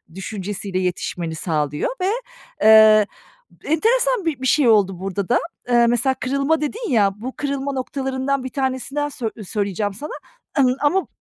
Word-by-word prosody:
düşüncesiyle 195 -1 -4
yetişmeni 175 -2 -3
sağlıyor 150 -3 -1
ve, 365 - +1 0.5
eee, 215 -1 +7 0.6
enteresan 465 +6 +2
bi 300 -6 -2
bir 260 - 0
şey 275 -1 +3
oldu 195 -5 +3
burada 195 0 -3
da. 245 - +4 0.3
Eee, 240 -1 +5
mesela 240 +3 +2
kırılma 275 +4 0
dedin 440 - -3
ya, 205 -5 +4
bu 250 +5 -7
kırılma 280 -1 -2
noktalarından 265 0 -2
bir 260 - -4
tanesinden 270 +2 -2
sö 240 -5 -4
söyleyeceğim 205 0 -2
sana, 290 +10 -7 0.5
ımm, 255 -2 +4
ama 310 +2 +2
255 Hz, 145 wpm, -21 LUFS, 200-280 Hz, 0.6 s, eee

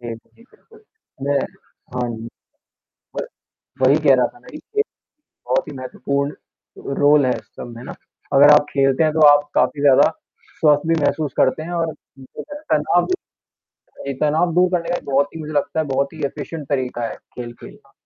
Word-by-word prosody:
जी, 120 -1 -5
जी, 120 - -19
बिल्कुल। 445 -1 -22 0.4
मैं 140 0 +1 0.6
हाँ 125 -1 -1
जी, 115 +1 -8 0.9
व - - 0 0.6
वही 135 +3 +6
कह 135 - +8
रहा 125 -1 +3
था - - -13
मैं - - -15
कि 425 +6 -1 0.7
बहुत 130 - +1
ही - - -7
महत्वपूर्ण 140 +2 -3 0.6
रोल 145 -1 +5
है 125 - +2
इस - - -13
सब 120 - -8
में 115 - -9
ना - - -7 0.4
अगर 145 +2 +8
आप 145 0 +5
खेलते 135 +2 +2
हैं 155 - +2
तो 155 -1 +5
आप 145 0 +5
काफ़ी 145 - +2
ज़्यादा 140 -2 +6 0.5
स्वस्थ 150 0 +3
भी 165 - +3
महसूस 150 -3 0
करते 145 +4 +2
हैं 170 - -7
और 160 -2 -2 0.3
जो 130 - -10
है 295 - -7
तनाब 155 +4 +2 0.8
भी 140 - -10
ये - - -1
तनाव 160 +3 +2
दूर 180 0 +4
करने 170 -2 -1
का 175 - +1
ये - - -4
बहुत 140 +3 +1
ही - - -6
मुझे 155 0 -7
लगता 145 +2 0
है 155 - 0
बहुत 140 +2 0
ही 155 -2 -7
एफ़िशिएंट 150 +1 -7
तरीक़ा 125 -4 -1
है - - -6 0.2
खेलना। 120 -1 -10
145 Hz, 190 wpm, -20 LUFS, 130-160 Hz, 0.9 s, कह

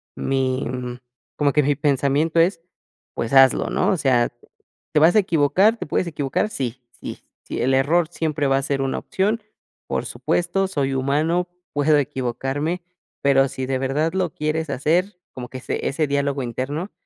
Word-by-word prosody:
mi, 130 -1 0 0.7
como 145 -1 +2
que 150 - +3
mi 145 +1 +2
pensamiento 145 +3 +1
es: 170 +1 +2 0.5
"Pues 115 - -3
hazlo", 135 -1 +5
¿no? - - +1
O 190 - +1
sea, 125 -5 +2 0.6
¿te - - +4
vas 165 +5 +5
a - - +7
equivocar? 185 +5 +3
¿Te - - -5
puedes 165 +4 -1
equivocar? 150 +5 -1
Sí, 130 - -4
sí, - - -8 0.2
sí, - - -5
el 130 +2 +2
error 155 +6 +3
siempre 155 -4 -1
va 135 0 +3
a - - +1
ser 140 0 -1
una 135 0 -1
opción, 210 +4 -1 0.5
por - - -2
supuesto, 175 +3 0
soy 140 -7 -1
humano, 155 +7 0 0.2
puedo 145 +1 +3
equivocarme, 135 +5 -2 0.4
pero, 135 -1 +4
si 130 -1 -4
de 130 0 -1
verdad 145 +5 0
lo 185 -4 -1
quieres 155 +1 -2
hacer, 170 +8 0 0.2
como 125 -1 -7
que 130 - -7
ese - - -3
ese 150 +2 0
diálogo 140 -1 0
interno, 140 - -4
145 Hz, 170 wpm, -22 LUFS, 135-165 Hz, 0.7 s, a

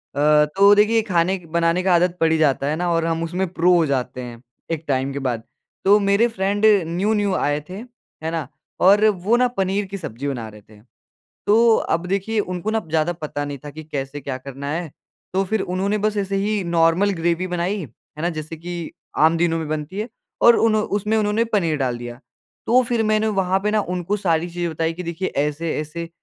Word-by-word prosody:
अ, 150 +1 +4
तो 200 +1 +7
देखिए 215 +2 +4
खाने 180 +2 +2 0.2
बनाने 170 +1 +2
का 185 -1 +3
आदत 175 +1 +2
पड़ 165 0 +3
ही 160 - +3
जाता 140 -3 +2
है 150 - 0
ना? 175 +2 -1
और 165 -1 +1
हम 165 0 -1
उसमे 180 +3 -1
प्रो 180 0 +2
हो 170 -2 +3
जाते 130 -3 -2
हैं, 120 -2 -9 0.3
एक 165 -1 -2
टाइम 135 0 0
के 140 - -3
बाद। 115 -2 -3 0.4
तो 205 +2 +6
मेरे 200 +3 +3
फ्रेंड 205 -1 0 0.2
न्यू-न्यू 200 +3 0
आए 145 -3 0
थे, - - -7 0.5
है 160 - -2
ना? 165 -5 -3 0.3
और 200 +3 +5 0.2
वो 230 +4 +4
ना 250 0 +3
पनीर 195 +1 0
की 195 +1 -6
सब्ज़ी 140 - -6
बना 120 -5 -3
रहे 105 0 -14
थे। 105 0 -19 0.7
तो 225 +2 +5
अब 170 +2 -1
देखिए 200 +4 0
उनको 185 +1 -3
ना 220 0 0
ज़्यादा 160 +2 +1
पता 155 -3 -5
नहीं 145 -1 -5
था 145 - -6
कि 155 +2 -10
कैसे 145 -1 -5
क्या 135 -1 -4
करना 140 +2 -7
है? 165 0 -3 0.4
तो 190 +1 +1
फिर 215 +3 -1
उन्होंने 195 +4 -1
बस 215 - -5
ऐसे 195 -1 -1
ही 205 +1 0
नॉर्मल 170 +3 +3
ग्रेवी 170 +2 0
बनाई, 180 +3 -2
है 140 +5 -14
ना? 170 - +1
जैसे 155 0 -6
कि 170 0 -6 0.3
आम 160 +2 +4
दिनों 165 -1 +1
में 160 -2 -4
बनती 155 +5 -4
है 215 +3 -3 0.3
और 235 -1 +7
उन 225 -1 +3
उसमें 210 0 0
उन्होंने 215 +1 +1
पनीर 195 -9 0
डाल 130 -3 -1
दिया। 120 +1 -8 0.5
तो 250 +2 +5
फिर 235 -2 +1
मैंने 215 0 +1
वहाँ 190 0 +2
पे 210 +2 0
ना 215 0 +2
उनको 180 +3 -1
सारी 175 -4 0
चीज़ें 175 0 -3
बताई 160 +1 -1
कि 180 +2 -7
देखिए 170 +2 -3
ऐसे 150 +3 -1
ऐसे, 165 +2 -6
175 Hz, 215 wpm, -21 LUFS, 155-200 Hz, 0.7 s, तो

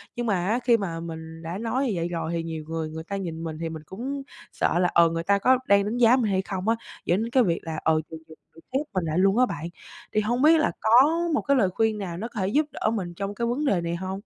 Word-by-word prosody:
Nhưng 240 - -2
mà 190 -5 0
á, 230 +4 +1
khi 240 -2 +4
mà 175 -6 -4
mình 160 -1 -8
đã 170 +3 -4
nói 230 +5 -1
như 215 - 0
vậy 170 0 -1
rồi 165 -1 -3
thì 165 -1 -1
nhiều 160 -1 -5
người 160 -1 -3
người 160 +1 -7
ta 200 +4 -5
nhìn 165 -4 -4
mình 160 -1 -5
thì 165 - -3
mình 160 -1 -8
cũng 270 - -5 0.3
sợ 175 - 0
là, 180 - +3
ờ, 170 -1 +6
người 165 0 -3
ta 200 +2 +2
có 255 +4 +4
đang 200 0 +5
đánh 220 +4 -2
giá 245 +1 +6
mình 225 -6 +1
hay 190 - +2
không 190 +1 -5
á, 225 - +3 0.3
dẫn 180 +5 +2
đến 230 - -4
cái 255 -2 +4
việc 170 -4 0
là, 160 -2 -4
ờ, 160 - +3 0.2
mình 160 -1 -9
mình 160 - -14 0.2
mình 165 - -16
khép 270 - +2
mình 185 -2 0
lại 155 +1 -1
luôn 195 +3 +3
á 255 - +5
bạn. 155 -8 -5 0.5
Thì 215 - +3
hông 240 +4 0
biết 320 +3 +6
là 310 - +2
có - - 0 0.4
một 300 - +2
cái 280 -1 +2
lời 195 -6 +3
khuyên 220 +3 0
nào 180 -4 -5
nó 220 - -4
có 235 - -7
thể 190 - 0
giúp 290 +9 +2
đỡ - - -1
mình 180 -5 -3
trong 195 +3 -4
cái 235 +1 -1
vấn 265 +6 -1
đề 190 -9 +2
này 170 0 -2
hông? 190 +2 -4
190 Hz, 300 wpm, -25 LUFS, 165-230 Hz, 0.5 s, ờ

